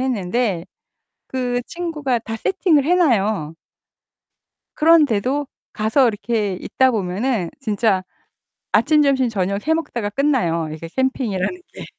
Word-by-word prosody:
했는데 215 -6 -1 0.6
그 250 -1 -1
친구가 305 -8 -2
다 225 0 -5
세팅을 320 - +2
해 345 +5 +3
놔요. 215 - +1 1.2
그런데도 290 -4 +3 0.3
가서 225 +5 +2
이렇게 210 -2 -1
있다 260 0 +2
보면은 205 -1 -1
진짜 215 -5 +1 0.7
아침, 305 -1 +4
점심, 270 -3 +2
저녁 200 +3 -2
해 320 - +4
먹다가 245 -10 -2
끝나요. 205 - 0
이게 160 +1 -8
캠핑이라는 260 - -1
게. - - -8
240 Hz, 255 characters per minute, -20 LUFS, 200-280 Hz, 1.2 s, 아침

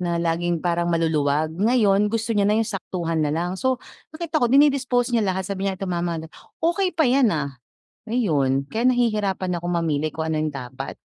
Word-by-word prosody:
na 175 -1 -1
laging 170 0 0
parang 170 0 +1
maluluwag, 155 -2 +1
ngayon 210 0 +3
gusto 230 +1 -2
niya 200 -1 +2
na 210 - +3
yung 225 - +1
saktuhan 180 -5 -3
nalang. 165 +4 -1
So, 260 +1 0 0.3
nakita 315 0 -2
ko - - +5
dini-dispose 260 -3 +3
niya 230 - +3
lahat 190 -1 -1
sabi 195 0 -2
niya, 190 - -3
"Ito 195 - -4
mama 170 -1 -1
look" 160 0 -9 0.3
"Okey 365 +3 +2
pa 320 - +4
yan, 255 -2 +4
ah." 140 -6 -3 0.5
ayun, 140 - +1
kaya 225 +2 -2
nahihirapan 210 -7 0
akong 175 +1 -3
mamili 155 -2 0
kung 160 0 -3
ano 155 - 0
'yong 155 0 -1
dapat 130 0 -7
185 Hz, 190 wpm, -23 LUFS, 160-230 Hz, 0.5 s, ko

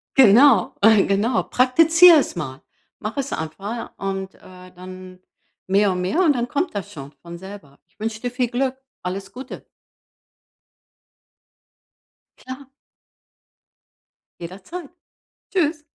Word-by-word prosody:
Genau, 245 -3 +5
genau. 215 +2 +3
Praktiziere 325 +6 +5
es - - -3
mal. 135 -6 -6 0.4
Mach 215 +5 -6
es 275 0 -3
einfach 200 +9 -6
und, 195 -1 -4
äh, 185 0 -15
dann 185 0 -12 0.5
mehr 200 +1 +3
und 180 0 -3
mehr 190 - 0
und 315 -5 +4
dann 240 -1 -2
kommt 290 +8 -2
das 200 -3 -5
schon 140 -2 -10
von 170 0 -10
selber. 190 -6 -12
Ich - - -41
wünsche 220 0 -4
dir 245 - -3
viel 250 0 -1
Glück. 260 +2 -2 0.3
Alles 195 +2 -5
Gute. 255 +4 -10 2.7
Klar. 260 +1 -10 1.7
Jederzeit. 195 - -9 0.6
Tschüss! 310 -4 0
210 Hz, 115 wpm, -21 LUFS, 185-265 Hz, 2.7 s, Genau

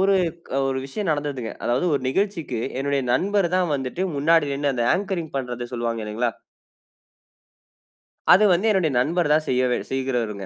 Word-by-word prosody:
ஒரு 195 0 +4 0.3
க - - -10 0.2
ஒரு 130 0 -1
விஷயம் 185 +4 -3
நடந்ததுங்க. 145 -6 -2
அதாவது 125 +9 +1
ஒரு 140 - 0
நிகழ்ச்சிக்கு 165 - -1 0.2
என்னுடைய 140 -1 0
நண்பரு 195 +4 +1
தான் 180 -4 +1
வந்துட்டு 135 +7 -2
முன்னாடி 150 0 +3
நின்னு 140 0 0
அந்த 120 -1 0
அங்கரிங் 185 -6 -3
பண்றத 125 -2 -4
சொல்வாங்க 115 -1 -2
இல்லைங்களா? 115 +2 -1 2.0
அது 205 +4 +6
வந்து 195 +6 +1
என்னுடைய 180 -7 +2
நண்பர் 165 +4 +1
தான் 155 0 +2
செய்யவ 125 -1 +2
செய்கிறவருங்க. 120 -7 -2
140 Hz, 150 wpm, -23 LUFS, 125-175 Hz, 2.0 s, அது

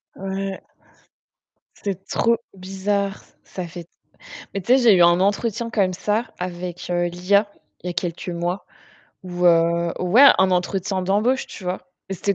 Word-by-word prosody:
Ouais. 195 0 -5 1.2
C'est 195 -1 -4
trop 230 0 +2 0.2
bizarre, 195 +1 -2
ç - - -28
ça 185 -2 -7
fait 170 0 -9 0.7
mais 195 - -2
tu 240 - +1
sais, 265 - +7
j'ai 225 -5 +6
eu 175 - +5
un 175 +1 +5
entretien 225 +3 0
comme 195 -5 +1
ça 210 +6 -2
avec, 180 -1 -5
heu, 175 0 +1
l'IA. 200 +4 +1 0.3
Il - - -9
y - - -1
a - - -3
quelques 175 0 -4
mois. 175 +2 -3 0.6
Où 180 -1 -4
heu 170 0 +3
ouais, 215 +10 +6
un 190 0 +4
entretien 185 +1 -1
d'embauche, 215 +8 +1
tu - - -11
vois? 180 0 -4 0.2
Mais 195 - -3
c'était 200 +2 -1
185 Hz, 165 wpm, -22 LUFS, 175-200 Hz, 1.2 s, sais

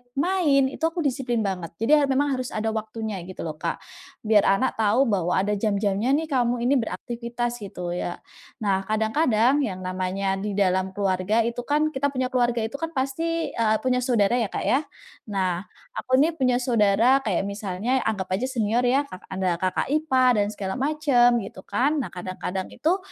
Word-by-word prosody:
main, 280 -4 +2
itu - - -10
aku 330 0 -3
disiplin 245 -4 -1
banget. 180 -4 -4
Jadi 225 - -1
ya 285 - +2
memang 275 0 +1
harus 255 - -5
ada 220 +1 -1
waktunya 220 -1 -4
gitu 185 - -7
loh 155 -2 -6
Kak. - - -3 0.4
Biar 215 -2 +4
anak 210 +5 +1
tahu 220 +4 +4
bahwa 180 -3 +1
ada 195 +2 +1
jam-jamnya 210 +4 +1
nih 315 +1 -2
kamu 245 -2 +1
ini 265 +2 +3
beraktifitas 240 +1 -4
gitu 180 -4 -6
ya. 175 0 -3 0.5
Nah, 195 -2 0
kadang-kadang 220 0 0 0.5
yang 185 -3 -5
namanya 190 +1 -2
di 205 0 -3
dalam 190 -1 +1
keluarga 200 +2 +1
itu 235 +1 -3
kan, 300 +1 +2
kita 285 -1 0
punya 260 -2 -2
keluarga 240 -2 +1
itu 225 +5 -4
kan 325 0 -4
pasti, 325 +5 -1
eee, 220 -1 +1
punya 255 -1 +2
saudara 240 -2 +2
ya 235 - +1
Kak - - -4
ya. 260 - +3 0.5
Nah, 185 -3 -1 0.3
aku 255 - +1
ini 310 - +4
punya 255 -2 +2
saudara 230 +1 +4
kayak 195 -6 +1
misalnya 200 +4 -2
anggap 195 -4 -2
aja 245 - -2
senior 230 -2 +1
ya, 265 +4 +3
ka 185 - -8
ada 185 -2 -1
kakak 185 +5 -1
ipar 260 -6 +3
dan 205 -1 +2
segala 190 -2 -4
macam 270 -4 +3
gitu 190 -1 -9
kan. 265 +9 +1
Nah - - -5
kadang-kadang 185 +1 -4
itu 340 +5 +1
225 Hz, 180 wpm, -24 LUFS, 195-260 Hz, 0.5 s, Biar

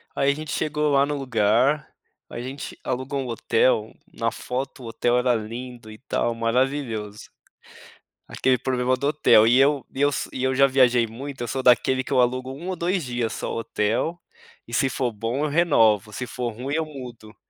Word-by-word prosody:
Aí 140 0 +3
a - - 0
gente 155 0 -6
chegou 150 0 0
lá 140 0 +4
no 145 0 -3
lugar, 130 +2 +1 0.4
a - - -7
gente 130 +3 -7
alugou 130 +2 -3
um 130 - -5
hotel, 115 -1 +1 0.2
na 115 +1 -1
foto 130 +1 -5
o 115 - -7
hotel 120 +2 +1
era 125 0 +2
lindo 115 +1 -7
e 110 - -11
tal, 120 -1 -1
maravilhoso. 115 -3 -2 1.0
Aquele 125 - +1
problema 130 0 0
do 140 +2 -2
hotel, 145 -7 +5
e 120 +2 +5
eu 140 -1 +3
e 135 - -4
eu 145 - +4
so 140 - -3
e 130 - -4
eu 130 0 +1
já 140 +1 +6
viajei 125 -3 +4
muito, 130 +4 -8
eu 120 - -2
sou 130 +4 -2
daquele 130 +1 +4
que - - -4
eu 130 - +5
alugo 130 +1 0
1 165 +7 -7
ou 185 - -2
2 175 +1 0
dias 120 -3 -2
só - - -4
o - - -3
hotel, 115 +10 -1 0.5
e 120 - -11
se 135 +3 +2
for 125 -1 -1
bom 115 +6 -3
eu 155 - 0
renovo, 115 - +3
se 130 - -4
for 125 -1 -4
ruim 130 +6 -4
eu 160 0 0
mudo. 125 -7 -10
130 Hz, 200 wpm, -24 LUFS, 115-140 Hz, 1.0 s, já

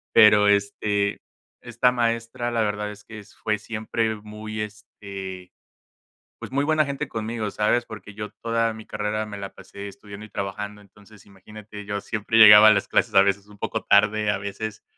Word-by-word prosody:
Pero, 105 -2 +7
este, 100 0 0 0.4
esta 120 +1 +1
maestra 115 0 -1
la 115 -1 0
verdad 105 0 -2
es 105 0 -13
que 110 - -11
s 105 - -16
fue 110 -1 0
siempre 110 +1 -2
muy, 105 +1 -7
este, 100 -3 -8 0.9
pues - - -8
muy 140 +2 +1
buena 155 0 +2
gente 140 0 -4
conmigo, 110 -2 -4
¿sabes?, 115 +4 +1
porque 105 -2 -10
yo 105 0 -6
toda 115 -1 0
mi 110 - -10
carrera 105 0 -3
me 105 -1 -8
la 100 -1 -7
pasé 100 0 -10
estudiando 100 +1 -11
y - - -18
trabajando, 105 +1 -5
entonces, 105 +1 -19
imagínate, 105 +1 -12
yo 100 -1 -3
siempre 110 0 -2
llegaba 110 -1 +10
a - - +8
las - - -1
clases - - +1
a 95 - +8
veces 100 0 0
un 105 0 -16
poco - - -3
tarde, 105 +1 +3
a 100 - 0
veces 100 +2 -6
105 Hz, 180 wpm, -24 LUFS, 100-110 Hz, 0.9 s, llegaba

